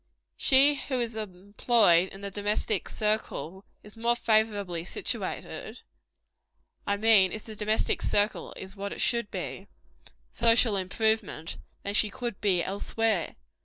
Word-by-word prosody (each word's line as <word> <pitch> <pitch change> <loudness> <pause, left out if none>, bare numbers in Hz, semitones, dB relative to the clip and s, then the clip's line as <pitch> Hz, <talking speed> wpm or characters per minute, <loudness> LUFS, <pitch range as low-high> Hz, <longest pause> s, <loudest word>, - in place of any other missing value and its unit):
She 275 +2 +5
who 260 -2 -1
is 235 -2 -2
employed 200 -2 +2
in 195 - -12
the 200 0 -5
domestic 205 0 -1
circle, 200 -4 -2 0.2
is 210 +1 -12
more 235 +1 +1
favorably 210 -7 0
situated 180 - -4 1.1
I 200 - +1
mean, 205 -3 +5
if 215 - -6
the 220 - -9
domestic 215 +1 0
circle 205 +1 0
is 190 +1 -9
what 200 0 -5
it - - -9
should 235 -3 0
be - - -6 0.6
for 235 - -4
social 230 -2 +5
improvement, 195 -2 -1 0.3
than 200 - -3
she 210 0 +3
could 235 -1 -5
be 185 -4 +2
elsewhere. 205 -1 -1
210 Hz, 135 wpm, -28 LUFS, 195-225 Hz, 1.1 s, She